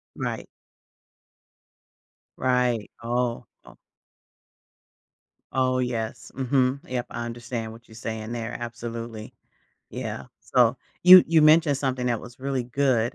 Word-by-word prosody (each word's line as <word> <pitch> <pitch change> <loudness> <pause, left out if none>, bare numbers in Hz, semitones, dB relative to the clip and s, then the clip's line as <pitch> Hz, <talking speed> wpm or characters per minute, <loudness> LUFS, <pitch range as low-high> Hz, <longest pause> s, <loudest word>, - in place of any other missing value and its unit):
Right. - - -4 1.9
Right 125 -4 +1
oh, 120 0 -1 0.2
oh - - -16 1.7
Oh, 130 -1 +1
yes, 115 -3 -3
mhm, 130 0 +1
yep, 125 -1 -3
I 120 - -5
understand 115 -1 -5
what 115 +2 -14
you're 110 - -15
saying 110 0 -5
there, 115 0 -4
absolutely. 115 -2 -6 0.6
Yeah, - - -5 0.2
so, 120 0 +3 0.3
you 180 0 +11
you 160 -1 +4
mentioned 155 -1 +5
something 130 -2 -2
that 120 -2 0
was 125 -1 -12
really 135 -1 -1
good, 125 -2 +1
120 Hz, 115 wpm, -25 LUFS, 115-130 Hz, 1.9 s, you